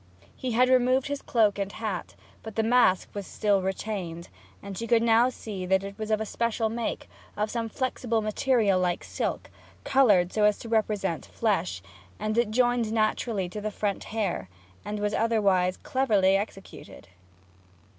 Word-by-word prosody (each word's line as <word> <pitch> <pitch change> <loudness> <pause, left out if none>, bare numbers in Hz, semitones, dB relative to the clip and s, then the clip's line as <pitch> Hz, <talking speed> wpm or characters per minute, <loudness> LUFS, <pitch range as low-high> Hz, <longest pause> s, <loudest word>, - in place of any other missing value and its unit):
He 255 -2 -3
had 250 +2 +4
removed 255 +1 +3
his 285 -1 -3
cloak 215 -4 +2
and 200 0 -2
hat, 215 -5 -4 0.3
but 220 -2 -9
the 225 - +1
mask 225 -5 +3
was 200 -2 -5
still 205 -2 +1
retained; 185 -3 -4 0.3
and 200 -1 -7
she 230 +4 -4
could 230 -1 +3
now 230 +2 +4
see 210 -6 -7
that 190 +1 +2
it 200 0 -7
was 215 0 -4
of 220 0 0
special 230 0 -1
make, 230 +1 -3 0.3
of 210 +1 -1
some 230 -1 -2
flexible 250 -3 -1
material 215 -2 +2
like 180 -1 0
silk, - - -4 0.3
coloured 205 -10 +4
so 215 - +1
as 210 -1 +3
to 230 - -9
represent 210 -6 0
flesh; 185 - -1 0.4
it 215 +1 0
joined 240 -1 +2
naturally 215 -2 0
to 210 +3 -6
the 215 - -2
front 205 -1 -3
hair, 200 - -2 0.3
and 210 0 -4
was 205 0 -1
otherwise 200 -6 +2
cleverly 210 -8 +2
executed. 195 - -6
215 Hz, 160 wpm, -27 LUFS, 195-230 Hz, 0.4 s, had